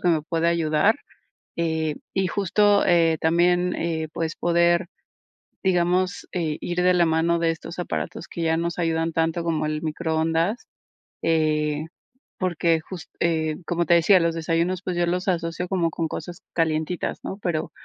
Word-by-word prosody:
que 180 - +1
me 160 -2 +3
puede 165 +1 -1
ayudar, 170 - +2 0.6
eh, 160 -2 -1 0.2
y 190 -1 +1
justo, 205 +2 +3
eh, 165 -2 +4
también, 175 +2 +2
eh, 160 -1 -2
pues, 165 -1 -3
poder, 170 +1 +2 0.8
digamos, 180 0 +1
eh, 160 -5 -2
ir 175 0 -1
de 180 0 +4
la 175 - +4
mano 165 +1 +2
de 165 -1 +2
estos 165 +1 -8
aparatos 175 -1 -4
que 170 - -6
ya 160 0 +1
nos 170 +1 -2
ayudan 165 -1 0
tanto 165 +1 0
como 160 -2 0
el 155 +1 -3
microondas, 165 +5 -1 0.5
eh, 155 -2 +1 0.6
porque, 170 -3 +1
just 175 +1 -9
eh, 160 -2 +1
como 170 0 0
te 170 - +6
decía, 180 +3 +5
los 165 -1 0
desayunos, 170 +3 0
pues, 180 - -3
yo 175 0 +1
los 180 +2 -1
asocio 170 -1 -1
como 175 -3 +1
con 165 0 -2
cosas 175 +2 -7
calientitas, 160 +1 -1
¿no?, 195 - -5
pero 170 -4 -2
170 Hz, 160 wpm, -24 LUFS, 160-175 Hz, 0.8 s, te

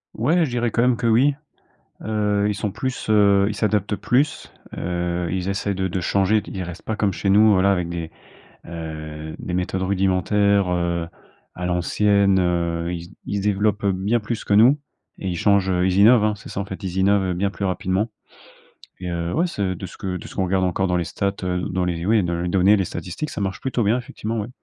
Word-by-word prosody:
Ouais, 160 +10 +2
je 155 - -1
dirais 120 -1 -1
quand 115 - +1
même 125 -1 +3
que - - -3
oui. 130 +6 +4 0.7
Heu, 105 -1 0
ils 105 - 0
sont 100 +1 -3
plus, 125 +2 -4
heu, 100 -2 +4
ils 105 - -4
s'adaptent 105 -1 0
plus. 130 +8 0 0.3
Heu, 85 0 -2
ils 95 +1 -2
essaient 100 +1 -1
de 95 0 -1
de 95 +1 -2
changer 100 +4 +2
de - - -11
ils 95 - -4
restent 90 -1 -7
pas 110 - -3
comme 105 -1 +1
chez 95 +2 -2
nous, 105 +2 +6
voilà, 100 +1 +4
avec 90 -3 0
des, 85 -2 -5 0.6
heu, 80 -2 -7
des 90 - -5
méthodes 90 +1 -1
rudimentaires, 95 +1 +2
heu, 85 -1 -1 0.5
à 90 - -4
l'ancienne. 100 +3 +2
Heu, 85 -1 0
ils 85 -1 -5
se - - -15 0.2
ils 100 - -2
développent 105 +1 0
bien 100 +4 +1
plus 110 +1 -4
que - - 0
nous 120 +8 +6 0.4
et 95 - -3
ils 90 - -3
changent, 100 0 +3
ils 95 0 +1
innovent. 110 +1 +6
Hein, 105 -1 +1
c'est 100 - -12
ça, - - -5
en 100 - -2
fait, 95 +1 -8
ils 95 -1 -4
innovent 95 -1 +2
bien 100 +3 0
plus 100 - -7
rapidement. 95 +3 -1 0.9
Et 90 - -6
heu, 85 0 -2
ouais, 170 - +1
c'est 100 - -2
de 95 - -7
ce - - -12
que 95 -2 -4
de - - -10
ce - - -12
qu'on 95 - 0
regarde 95 +1 +1
encore 95 +1 0
dans 90 - 0
les 85 - -1
stats, 100 +5 -2
heu, 90 0 -1
dans 90 0 -1
les 85 -1 -2
oui 110 +1 +3
dans 85 -1 -2
les 90 - -2
données 95 +3 +4
les 95 - 0
statistiques, 90 - -5
ça - - -6
marche 95 -1 -3
plutôt 130 -2 -1
bien, 105 +4 +3
effectivement. 115 -2 -4
Ouais. 105 - -5
95 Hz, 225 wpm, -22 LUFS, 90-105 Hz, 0.9 s, nous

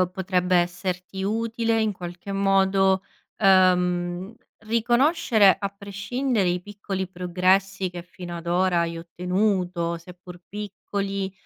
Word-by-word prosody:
ehm, 180 -1 +2
potrebbe 185 -1 0
esserti 180 +2 -2
utile, 225 +1 0
in 215 -1 +1
qualche 180 +1 -8
modo, 195 -1 +3 0.4
ehm, 180 0 +3 0.2
riconoscere, 235 - +3
a 200 - -2
prescindere, 200 +2 -2
i 175 0 0
piccoli 195 -2 -5
progressi 185 +1 +1
che 175 -1 -7
fino 175 -1 -8
ad 170 0 -9
ora 175 0 +2
hai 170 0 -2
ottenuto. 180 -1 -1
Seppur 180 +1 -13
piccoli, 200 -1 -4
190 Hz, 115 wpm, -24 LUFS, 180-200 Hz, 0.4 s, modo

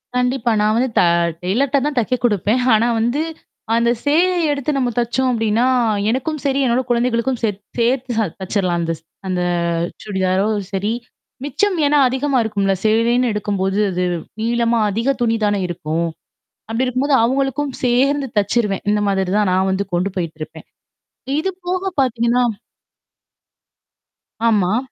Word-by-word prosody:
கண்டிப்பா. 250 -1 +1
நான் 215 +1 +2
வந்து 255 +1 +1
த - - +6 0.4
டெய்லர்ட 260 +9 +1
தான் 295 -3 -2
தைக்க 245 +2 0
குடுப்பேன். 215 +3 +1
ஆனா 225 +2 +3
வந்து 240 +7 0 0.5
அந்த 235 0 +2
சேலய 345 +6 +3 0.2
எடுத்து 285 +1 -1
நம்ம 255 -3 +1
தச்சோம் 240 +2 0
அப்பிடின்னா 225 0 +1 0.4
எனக்கும் 270 +6 -1
சரி, 275 0 +1
என்னோட 245 +1 +2
குழந்தைகளுக்கும் 240 +1 +1
சரி, 210 -4 -1 0.2
சேத் - - -2
சேர்த்து 245 +2 +1
ச 215 - +1
தச்சுர்லாம் 185 -3 0
அந்த 165 0 -1
ச் - - -35 0.2
அந்த 180 -1 -1 0.6
சுடிதாரோ! 190 -1 0 0.3
சரி. 200 +3 -1 0.5
மிச்சம் 360 +8 0
ஏன்னா 295 +1 +3
அதிகமா 265 +1 0
இருக்கும்ல. 200 -3 0
சேலைன்னு 230 +2 +2
எடுக்கும்போது 200 -1 -1
அது 180 0 -1 0.4
நீளமா 235 0 +1
அதிக 230 +6 -1
துணி 230 -1 +2
தானே 205 -1 +1
இருக்கும். 165 0 -2 0.6
அப்பிடி 230 +3 0
இருக்கும்போது 265 +3 +1
அவுங்களுக்கும் 270 +3 0
சேர்ந்து 270 +3 +2
தச்சுருவேன். 205 -1 0
இந்த 210 0 +1
மாதிரி 190 -2 0
தான் 205 -3 +2
நான் 190 +1 +2
வந்து 195 +1 0
கொண்டு 185 +3 0
போயிட்டு 165 -3 -3
இருப்பேன். 160 +1 -9 0.7
இதுபோக 370 +2 -2
பார்த்தீங்கன்னா 240 0 +1 2.0
ஆமா. 210 -2 +2
235 Hz, 140 wpm, -19 LUFS, 200-260 Hz, 2.0 s, த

